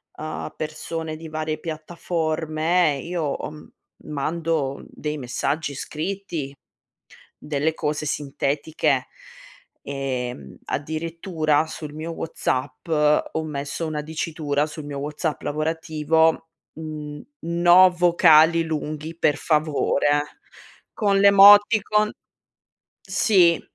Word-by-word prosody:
uhm, 155 0 -6
persone 155 +1 -5
di 160 +1 -9
varie 155 0 -3
piattaforme, 160 0 -1
io 170 -1 -3
ho 145 0 -3
m 150 0 -13 0.4
mando 155 -1 -2
dei 150 0 -5
messaggi 140 +3 -2
scritti, 155 -2 -5 0.8
delle 150 +1 -1
cose 150 -1 -2
sintetiche. 145 0 -1 0.8
Ehm, 125 - -4
addirittura 160 0 -1
sul 155 -1 -8
mio 160 +2 -5
WhatsApp 160 -3 -3
ho 150 0 +2
messo 145 +2 -4
una 155 -1 -3
dicitura 155 -2 -2
sul 155 0 -8
mio 145 -1 -6
WhatsApp 150 +2 -3
lavorativo 160 +1 0 0.3
n-no 170 - +2
vocali 170 -2 +5
lunghi 155 0 -4
per 150 -3 +2
favore, 150 -1 +1 0.5
con 200 -2 +1
l'emoticon 205 +2 +6 0.9
sì 175 -6 +4
155 Hz, 90 wpm, -23 LUFS, 150-165 Hz, 0.9 s, l'emoticon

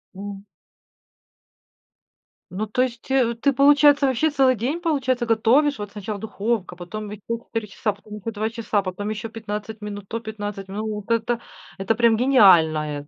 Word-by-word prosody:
М. 200 0 -8 2.1
Ну, 195 +4 -3
то 220 +4 -1
есть 240 -2 -2
ты, 255 +1 +2
получается, 290 +1 +5
вообще 265 +5 +2
целый 265 -3 +3
день, 265 +10 -2
получается, 260 -7 0
готовишь? 250 +6 +3
Вот 205 -1 -6
сначала 205 0 -5
духовка, 210 -2 -2
потом 205 +4 -7
еще 210 0 -9 0.2
4 225 -2 -4
часа, 210 +2 -2
потом 210 +1 -12
еще 225 +3 -5
2 215 0 -2
часа, 225 -2 -1
потом 195 +2 -4
еще 215 +1 -4
15 215 0 -6
минут, 205 -1 -6
то 230 - -3
15 205 -3 -6
минут. 210 +3 -4 0.2
Вот - - -4
это- 230 +1 0 0.4
это 195 +3 0
прям 230 -1 +4
гениальное 160 - +4
220 Hz, 155 wpm, -23 LUFS, 205-245 Hz, 2.1 s, получается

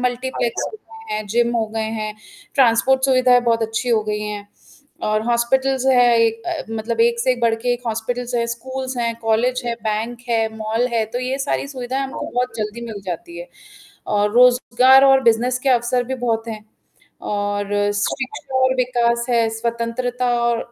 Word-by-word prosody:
Multiplex 245 -1 -2 0.4
हैं, 215 0 -3
gym 235 +3 +1
हो 220 -1 0
गए 220 - -1 0.2
हैं। 215 0 -4 0.4
ट्रांसपोर्ट 260 +1 +3
सुविधाएँ 255 -2 +4
बहुत 230 -1 +1
अच्छी 225 +3 -2
हो 225 -2 +3
गई 210 0 -2
हैं 210 -1 -6 0.6
और 215 0 +1
हॉस्पिटल्स 260 +3 +1
जो 265 - +4
है 240 -1 +5
एक 225 0 -2
अ, - - -3
मतलब 230 +1 -1
एक 235 0 -2
से 255 +2 +2
एक 250 - -3
बढ़ 230 -1 +3
के 245 +2 -1
एक 245 0 -6
हॉस्पिटल्स 240 +2 -3
है 235 0 +1
स्कूल्स 260 +1 -6
है, 235 -1 0
कॉलेज 235 +3 +1
है, 235 -1 -1
बैंक 225 +3 -3
है, 225 -1 +2
मॉल 220 +3 0
है, 225 -1 +1
तो 230 +3 -5
ये 255 +2 -2
सारी 275 - -1
सुविधाएँ 260 0 -3
हमको 270 - -5
बहुत 250 -1 -1
जल्दी 215 +2 -4
मिल 205 -3 -7
जाती 170 -1 -6
है 175 - -9 0.7
और 205 0 +2
रोज़गार 250 +2 +6
और 270 -1 +6
बिज़नेस 240 +1 +2
के 275 - +2
अवसर 245 0 +1
भी 260 - -3
बहुत 225 0 -1
हैं 215 -1 -7 0.6
और 205 0 -2 0.3
शिक्षा 260 +5 -3
और 260 0 +3
विकास 240 -1 +1
है, 230 -2 +3
स्वतंत्रता 235 +2 -2
और 235 -1 +1
235 Hz, 180 wpm, -20 LUFS, 225-250 Hz, 0.7 s, रोज़गार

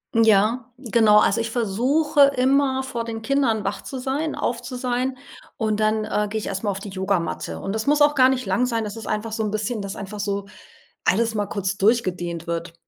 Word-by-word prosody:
Ja, 225 +3 +3
genau, 225 -4 +4
also 210 +2 +3
ich 230 - -3
versuche 260 +7 +3
immer 265 +1 +2
vor 240 -3 -4
den 225 -1 -6
Kindern 260 -6 +1
wach 195 +1 -3
zu 270 - -7
sein, 275 +5 -2
auf 235 0 -2
zu 250 +1 -7
sein 250 +1 -1 0.4
und 215 -2 0
dann, 215 0 +1
äh, 210 -1 0
gehe 220 - -3
ich - - -6
erst 195 +1 -4
mal 210 - 0
auf 195 -1 -2
die 205 - -8
Yogamatte. 190 -2 -2
Und 195 - -4
das 220 +3 -3
muss 295 +1 +4
auch 295 0 +5
gar 260 -2 +5
nicht 255 -2 -1
lang 200 +6 +1
sein, 230 -2 -1
das 210 0 -5
ist 225 - -8
einfach 215 +1 -2
so 220 - -2
'n 210 - -1
bisschen, 215 +1 -2
dass 195 -1 -5
einfach 200 +1 -7
so 200 -1 -2 0.6
alles 225 +3 +2
mal 205 -2 -1
kurz 195 -1 -3
durchgedehnt 180 -6 0
wird. 170 -1 -4
220 Hz, 220 wpm, -23 LUFS, 200-255 Hz, 0.6 s, auch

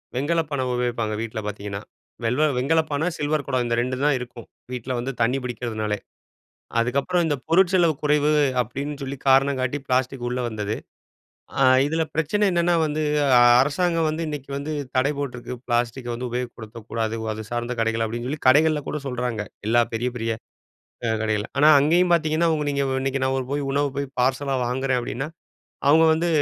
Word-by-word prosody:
வெண்கலப்பானை 145 0 0
உபயோகிப்பாங்க. 120 -3 -1
வீட்ல 110 -1 -4
பார்த்தீங்கன்னா, 100 -1 -5 0.4
வெல்வ 125 +6 +1
வெண்கலப்பானை 155 +3 +1
சில்வர் 150 0 -1
குடம் 130 -2 +1
இந்த 120 0 0
ரெண்டு 130 +1 -2
தான் 150 -1 +4
இருக்கும். 120 -2 -9 0.2
வீட்ல 125 0 -5
வந்து 130 +3 -3
தண்ணி 125 +4 +2
பிடிக்கிறதுனாலே! 110 -4 -3 0.8
அதுக்கப்பறம் 140 +9 +1
இந்த 150 -2 0
பொருட் 180 +2 +4
செலவு 170 -3 +4
குறைவு 150 0 +3 0.3
அப்பிடின்னு 140 +5 -4
சொல்லி 135 +1 -4
காரணம் 135 +1 +4
காட்டி 130 +3 -1
பிளாஸ்டிக் 130 0 0
உள்ள 125 +1 -2
வந்தது. 105 -1 -3 0.8
ஆ - - +5 0.2
இதில 160 +2 0
பிரச்சனை 165 +7 +1
என்னன்னா, 175 0 +2
வந்து 155 +1 -2 0.6
அரசாங்கம் 165 +3 +1
வந்து 155 +2 -2
இன்னக்கி 145 -2 -6
வந்து 145 +2 -4 0.2
தடை 135 +3 +3
போட்டிருக்கு. 125 -3 -5
பிளாஸ்டிக்க 120 +1 -1
வந்து 125 +1 -4
உபயோகப்படுத்தக்கூடாது. 115 -2 -4 0.2
அது 110 +1 -7
சார்ந்த 120 +1 -2
கடைகள் 115 0 +1
அப்பிடின்னு 120 +2 -4
சொல்லி, 150 +2 -4
கடைகள்ல 150 +2 +4
கூட 150 - -3
சொல்றாங்க. 125 -4 -2 0.2
எல்லா 120 +1 +5
பெரிய, 120 +2 -1
பெரிய 115 -1 -1 0.7
அ - - +1
கடைகள்ல. 110 -1 -1
ஆனா, 145 +2 +5
அங்கேயும் 175 +5 +3
பார்த்தீங்கன்னா 160 0 +2
அவுங்க 155 -2 0
நீங்க 140 0 0 0.2
இன்னக்கி 135 0 -1
நான் 130 -1 -1
போய் 145 -1 -1
உணவு 145 +1 +1
போய் 140 0 -1
பார்சலா 135 +2 +1
வாங்குறேன் 130 +1 0
அப்பிடின்னா 130 +4 -4 0.6
அவுங்க 160 +3 +6
வந்து 165 +2 0
130 Hz, 160 wpm, -23 LUFS, 120-150 Hz, 0.8 s, அவுங்க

